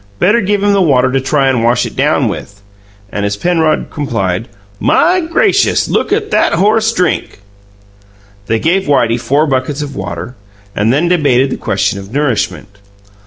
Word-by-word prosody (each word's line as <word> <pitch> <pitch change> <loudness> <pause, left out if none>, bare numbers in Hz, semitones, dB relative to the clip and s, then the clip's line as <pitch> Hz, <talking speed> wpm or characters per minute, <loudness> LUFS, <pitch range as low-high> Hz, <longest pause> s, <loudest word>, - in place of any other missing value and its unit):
Better 210 - +3
give 205 0 0
him 205 0 +3
the 200 - +2
water 130 -6 +2
to 135 0 0
try 135 +1 +1
and 125 -3 +1
wash 120 +1 +2
it - - -7
down - - +1
with." 100 0 -7 0.5
And, 100 - -3
as 100 0 -2
Penrod 160 +1 0
complied, 115 -8 -2 0.3
"My 365 +2 +3
gracious, 370 +5 +1
look - - -1
at 425 0 -1
that - - +2
horse 220 +3 +2
DRINK!" 180 -7 -1 1.1
They 115 - +1
gave 175 +9 0
Whitey 120 -5 +2
four 145 +5 +1
buckets 140 +1 -2
of 140 -1 -7
water, 90 +4 -6 0.4
and 105 +3 +1
then 150 +7 +1
debated 140 -7 +2
the - - -1
question 100 0 -1
of 100 +1 -11
nourishment. 115 -7 -2
140 Hz, 165 wpm, -13 LUFS, 115-180 Hz, 1.1 s, Better